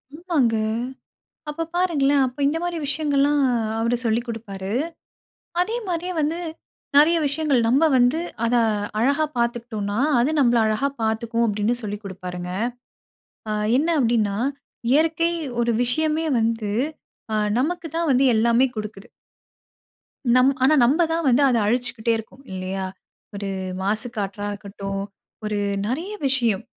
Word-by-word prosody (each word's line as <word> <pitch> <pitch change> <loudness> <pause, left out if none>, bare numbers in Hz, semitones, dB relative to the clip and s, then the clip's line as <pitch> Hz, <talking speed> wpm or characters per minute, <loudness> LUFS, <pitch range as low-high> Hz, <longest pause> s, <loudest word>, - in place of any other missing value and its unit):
ஆமாங்க. 310 -9 +1 0.9
அப்ப 330 +2 -3
பாருங்களேன்! 290 -6 +3
அப்ப 255 +2 -6
இந்த 300 +3 0
மாரி 350 -1 -2
விஷயங்கள்லாம் 290 -1 +2 0.4
அவரு 230 +2 +1
சொல்லிக் 230 +2 0
குடுப்பாரு. 200 -4 -6 0.9
அதே 435 +6 -1
மாதிரியே 360 +1 -2
வந்து 315 +3 0 0.6
நெறைய 320 +4 +6
விஷயங்கள் 285 -2 +1
"நம்ப 265 +7 +4
வந்து 250 +5 +3 0.3
அத 235 +1 +2 0.4
அழகா 280 +6 +2
பாத்துக்கிட்டோம்னா, 230 -3 -2 0.2
அது 260 +6 +2
நம்பள 240 -3 +4
அழகா 220 +6 +1
பாத்துக்கும்." 225 +1 0
அப்படின்னு 210 +2 +1
சொல்லிக் 210 0 -5
குடுப்பாருங்க. 180 -2 -6 1.0
அ - - -1 0.3
என்ன 310 +5 +1
அப்படின்னா? 225 -5 +1 0.5
"இயற்கை 325 +3 +3 0.3
ஒரு 235 0 +2
விஷயமே 310 +5 0
வந்து 225 -2 0 0.6
அ - - +2 0.2
நமக்கு 330 +4 -1
தான் 330 -2 0
வந்து 260 +1 +4
எல்லாமே 235 +3 +4
குடுக்குது." 215 0 -6 1.3
நம் 255 +1 +6
ஆனா 270 +4 +5
நம்ப 290 +8 +3
தான் 330 0 0
வந்து 255 +2 +4
அத 250 -3 +3
அழிச்சுக்கிட்டே 235 0 0
இருக்கோம், 260 +5 -11
இல்லையா? 190 +1 -3 0.5
ஒரு 200 0 -4 0.3
மாசு 215 +5 0
காற்றா 205 0 -3
இருக்கட்டும், 195 -1 -5 0.4
ஒரு 210 -1 -1 0.3
நெறைய 310 - -3 0.2
விஷயம் 235 -7 +1
240 Hz, 125 wpm, -23 LUFS, 215-295 Hz, 1.3 s, நெறைய